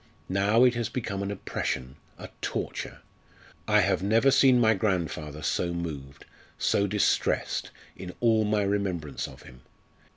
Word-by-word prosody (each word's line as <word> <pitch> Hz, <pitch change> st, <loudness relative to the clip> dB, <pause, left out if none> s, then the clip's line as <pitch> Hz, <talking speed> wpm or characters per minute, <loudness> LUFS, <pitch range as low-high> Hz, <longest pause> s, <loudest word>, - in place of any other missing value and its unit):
Now, 100 Hz, +5 st, +3 dB
it 125 Hz, -1 st, +5 dB
has 120 Hz, -1 st, -2 dB
become 100 Hz, -6 st, -4 dB
an 100 Hz, -, -3 dB
oppression 65 Hz, -9 st, -4 dB, 0.2 s
a -, -, -9 dB
torture. -, -, -4 dB, 0.7 s
I 105 Hz, 0 st, +5 dB
have 95 Hz, -1 st, +1 dB
never 115 Hz, +7 st, +3 dB
seen 130 Hz, -2 st, +5 dB
my 110 Hz, -2 st, +5 dB
grandfather 85 Hz, -7 st, -2 dB
so 85 Hz, +2 st, 0 dB
moved, 75 Hz, -5 st, -6 dB, 0.3 s
so 100 Hz, -, +1 dB
distressed, 105 Hz, +1 st, 0 dB, 0.3 s
in 90 Hz, -1 st, -8 dB
all 115 Hz, -2 st, +3 dB
my 105 Hz, 0 st, +1 dB
remembrance 95 Hz, -7 st, -2 dB
of -, -, -13 dB
him. 65 Hz, 0 st, -15 dB
100 Hz, 140 wpm, -27 LUFS, 85-110 Hz, 0.7 s, it